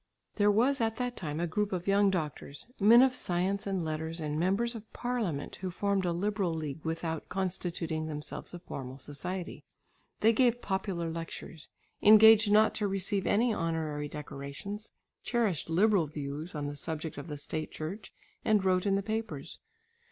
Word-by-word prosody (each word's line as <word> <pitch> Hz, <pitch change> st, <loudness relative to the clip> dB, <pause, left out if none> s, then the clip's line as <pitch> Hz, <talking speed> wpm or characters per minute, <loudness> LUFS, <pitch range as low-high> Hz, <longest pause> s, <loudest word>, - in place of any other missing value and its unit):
There 205 Hz, -1 st, +4 dB
was 240 Hz, +6 st, +3 dB
at 225 Hz, -1 st, +1 dB
that 245 Hz, +1 st, -2 dB
time 150 Hz, -2 st, -4 dB
a 175 Hz, -, +1 dB
group 205 Hz, +5 st, -1 dB
of 180 Hz, -2 st, -2 dB
young 200 Hz, 0 st, +4 dB
doctors, 150 Hz, -5 st, -4 dB
men 230 Hz, +5 st, +8 dB
of 265 Hz, -1 st, +3 dB
science 190 Hz, -1 st, 0 dB
and 190 Hz, -4 st, -1 dB
letters, 160 Hz, +1 st, -3 dB
and 150 Hz, -1 st, -2 dB
members 200 Hz, +7 st, +1 dB
of 220 Hz, -2 st, -10 dB
parliament 225 Hz, -, -2 dB
who 185 Hz, -, -4 dB
formed 195 Hz, +1 st, 0 dB
a 175 Hz, -, +1 dB
liberal 190 Hz, -1 st, 0 dB
league 155 Hz, -1 st, -5 dB
without 160 Hz, -1 st, -3 dB
constituting 175 Hz, -4 st, -2 dB
themselves 150 Hz, -1 st, -6 dB
a -, -, -5 dB
formal 135 Hz, -6 st, -7 dB
society. 170 Hz, +7 st, -5 dB, 0.6 s
They 225 Hz, +2 st, +5 dB
gave 245 Hz, 0 st, +3 dB
popular 190 Hz, -5 st, -2 dB
lectures, 165 Hz, -1 st, -7 dB, 0.3 s
engaged 220 Hz, 0 st, +8 dB
not 215 Hz, +1 st, +5 dB
to 210 Hz, -, 0 dB
receive 195 Hz, 0 st, -1 dB
any 230 Hz, +3 st, +3 dB
honorary 160 Hz, -4 st, -2 dB
decorations, 150 Hz, +9 st, -7 dB, 0.3 s
cherished 215 Hz, -, 0 dB
liberal 190 Hz, 0 st, +3 dB
views 150 Hz, +3 st, -5 dB
on 145 Hz, -1 st, -3 dB
the 145 Hz, 0 st, -4 dB
subject 155 Hz, 0 st, -4 dB
of 145 Hz, -, -8 dB
the 150 Hz, -2 st, -5 dB
State 155 Hz, +2 st, -4 dB
Church 175 Hz, +8 st, -6 dB, 0.3 s
and 210 Hz, -3 st, +3 dB
wrote 185 Hz, +1 st, +2 dB
in 195 Hz, -, +3 dB
the 195 Hz, -, 0 dB
papers. 205 Hz, -9 st, -4 dB
180 Hz, 165 wpm, -30 LUFS, 155-210 Hz, 0.6 s, men